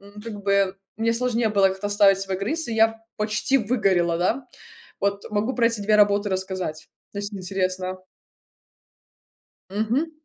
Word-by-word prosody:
м, 200 +1 -13
как 210 -3 -7
бы, 200 -1 +2 0.2
мне 230 +1 +1
сложнее 235 -2 +1
было 200 -2 +4
как-то 190 +2 -4
оставить 200 -1 +5
свой 195 -1 -2
грыз, 310 +11 -1
и 225 - -2
я 225 0 +3 0.2
почти 215 +5 +1
выгорела, 195 -7 +1
да. 235 +9 0 0.5
Вот, 200 0 -1
могу 215 +5 -1
про 235 -2 +3
эти 230 -3 -1
2 210 +1 +3
работы 205 0 +3
рассказать, 185 -4 -4 0.2
ну, 200 - -6
если 205 0 -5
интересно. 185 0 -2 1.7
Мгм. 225 +10 0
205 Hz, 150 wpm, -24 LUFS, 190-225 Hz, 1.7 s, оставить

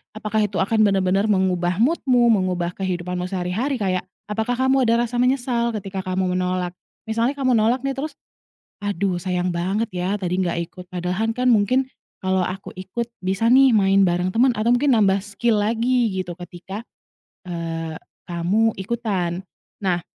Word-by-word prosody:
apakah 215 0 0
itu 205 -1 -2
akan 200 +4 +1
benar-benar 195 -1 +2
mengubah 185 -2 +1
mood-mu, 250 -2 +3
mengubah 185 -5 +1
kehidupanmu 180 -1 -3
sehari-hari? 195 +9 -1
Kayak, 185 -3 0 0.2
apakah 220 +3 -1
kamu 265 0 +3
ada 230 +1 +3
rasa 240 - -7
menyesal 245 -2 +1
ketika 195 -2 -4
kamu 185 0 -1
menolak? 180 -1 -1 0.3
Misalnya, 230 +3 +1
kamu 260 -3 +2
nolak 225 +3 +3
nih, 275 0 -1
terus 295 +3 -3 0.7
"Aduh, 200 -2 0
sayang 180 0 -1
banget 195 +6 0
ya, 180 +3 0
tadi 180 -1 -1
nggak 170 -1 -1
ikut 180 -1 -11
padahal 180 +5 -1
kan, 250 0 0
mungkin 240 +5 +3 0.4
kalau 190 0 +1
aku 190 +2 -5
ikut, 190 +6 -4 0.2
bisa 190 +4 +1
nih, 260 +2 +6
main 195 -2 +4
bareng 180 0 +1
teman, 250 +3 +5
atau 230 +2 +2
mungkin 275 +3 +2
nambah 195 -1 +3
skill 210 +1 0
lagi," 235 +1 +1
gitu, 185 -2 -4
ketika, 190 +5 -8 0.6
eee, 165 -2 -4 0.3
kamu 190 +6 +1
ikutan. 190 -5 -2 0.4
Nah, 180 -3 0
195 Hz, 155 wpm, -22 LUFS, 180-230 Hz, 0.7 s, nih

